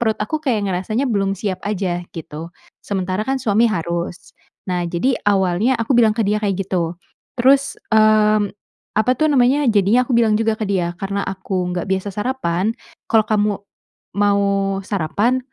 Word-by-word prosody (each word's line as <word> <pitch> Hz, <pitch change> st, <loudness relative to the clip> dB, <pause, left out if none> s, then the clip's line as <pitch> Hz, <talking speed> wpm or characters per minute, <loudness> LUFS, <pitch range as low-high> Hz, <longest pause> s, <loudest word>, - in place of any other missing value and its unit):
perut 220 Hz, -2 st, +1 dB
aku 310 Hz, +9 st, -2 dB
kayak 235 Hz, -9 st, 0 dB
ngerasanya 215 Hz, +9 st, -1 dB
belum 195 Hz, -2 st, 0 dB
siap 190 Hz, -2 st, -3 dB
aja. 185 Hz, -4 st, -1 dB
Gitu, 160 Hz, 0 st, -7 dB, 0.3 s
sementara 190 Hz, 0 st, -2 dB
kan 270 Hz, -, +1 dB
suami 230 Hz, -2 st, +2 dB
harus. 170 Hz, -2 st, -4 dB, 0.3 s
Nah, 180 Hz, -2 st, -2 dB
jadi 185 Hz, +10 st, 0 dB
awalnya 195 Hz, +5 st, +2 dB
aku 230 Hz, +3 st, -1 dB
bilang 225 Hz, -3 st, +4 dB
ke 225 Hz, -, +1 dB
dia 210 Hz, +1 st, +1 dB
kayak 200 Hz, -3 st, 0 dB
gitu. 175 Hz, -2 st, -2 dB, 0.4 s
Terus, 270 Hz, +3 st, +3 dB, 0.2 s
mmm, 215 Hz, -1 st, +4 dB, 0.5 s
apa 220 Hz, +4 st, +2 dB
tuh 310 Hz, 0 st, +2 dB
namanya, 270 Hz, 0 st, +3 dB
jadinya 220 Hz, +4 st, +3 dB
aku 245 Hz, -, +2 dB
bilang 220 Hz, -2 st, +3 dB
juga 225 Hz, -1 st, +1 dB
ke 220 Hz, -, -3 dB
dia, 175 Hz, -3 st, -1 dB
"Karena 200 Hz, 0 st, -3 dB
aku 190 Hz, -1 st, -3 dB
enggak 175 Hz, -1 st, -2 dB
biasa 190 Hz, +1 st, -2 dB
sarapan, 210 Hz, -4 st, -1 dB, 0.3 s
kalau 220 Hz, -2 st, +3 dB
kamu 210 Hz, -1 st, +2 dB, 0.7 s
mau 200 Hz, -1 st, +3 dB, 0.4 s
sarapan 205 Hz, +7 st, 0 dB
205 Hz, 160 wpm, -19 LUFS, 185-230 Hz, 0.7 s, bilang